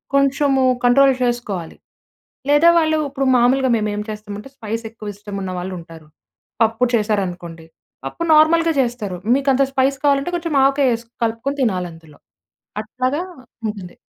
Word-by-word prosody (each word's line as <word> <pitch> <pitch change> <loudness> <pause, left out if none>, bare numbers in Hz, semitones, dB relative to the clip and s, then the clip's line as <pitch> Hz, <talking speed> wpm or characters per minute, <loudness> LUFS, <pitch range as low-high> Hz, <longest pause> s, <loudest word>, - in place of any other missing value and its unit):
కొంచెము 275 -1 +2 0.2
కంట్రోల్ 270 +2 +5
చేసుకోవాలి. 215 -9 -3 0.7
లేదా 295 +4 +6
వాళ్ళు 315 -1 +1
ఇప్పుడు 275 -1 -2
మామూలుగా 260 +2 +3
మేమేం 210 -1 -2
చేస్తామంటే, 210 +3 -7
స్పైస్ 225 +1 -4
ఎక్కువ 215 -2 -8
ఇష్టం 205 0 -9
ఉన్న 185 - -4
వాళ్ళు 185 +1 -5
ఉంటారు. 165 -2 -13 0.6
పప్పు 225 +2 0
చేశారనుకోండి. 180 -6 -2 0.4
పప్పు 235 - -4
నార్మల్‌గా 330 +2 +5
చేస్తారు. 225 -7 -3 0.2
మీకు 275 0 0
అంత 270 +1 +3
స్పైస్ 270 +1 +1
కావాలంటే, 280 +5 +2
కొంచెం 335 -3 -3
ఆవకాయ 270 -3 +3
ఎసి 230 0 -16 0.2
కలుపుకొని 255 +6 -3
తినాలి 185 -6 -1
అందులో. 160 -2 -17 0.6
అట్లాగా 255 +8 -2 0.5
ఉంటుంది. 195 -4 -7
240 Hz, 135 wpm, -19 LUFS, 205-275 Hz, 0.7 s, లేదా